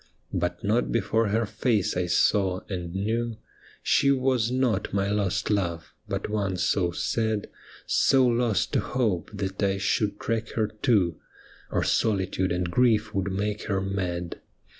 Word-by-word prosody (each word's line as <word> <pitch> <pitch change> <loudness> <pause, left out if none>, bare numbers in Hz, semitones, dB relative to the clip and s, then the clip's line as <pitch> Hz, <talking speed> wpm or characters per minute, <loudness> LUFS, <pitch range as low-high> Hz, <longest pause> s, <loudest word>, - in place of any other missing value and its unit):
But 90 -1 -2
not 110 +4 +1
before 115 0 +1
her 110 +3 +1
face 110 0 0
I 90 0 0
saw, 95 0 +2
and 90 -2 -5
knew 115 +3 -1 0.5
She 140 - +3
was 130 -4 +2
not 125 -5 0
my 100 0 +1
lost 105 0 0
love, 85 -5 -1
but - - -3
one 100 -3 -1
so 90 0 +1
sad, 110 +4 -1 0.3
So 130 -1 +4
lost 120 -3 +1
to - - +3
hope, 110 -9 -1
that 100 -1 -4
I 100 -1 +2
should 105 +1 0
track 115 0 -2
her 110 -2 0
too, 105 -6 +1 0.5
Or - - 0
solitude 95 -3 +1
and 90 0 -1
grief 110 -1 +2
would 95 -1 -1
make 105 +2 -2
her 100 -3 0
mad. 90 -3 -3
105 Hz, 150 wpm, -26 LUFS, 95-115 Hz, 0.5 s, So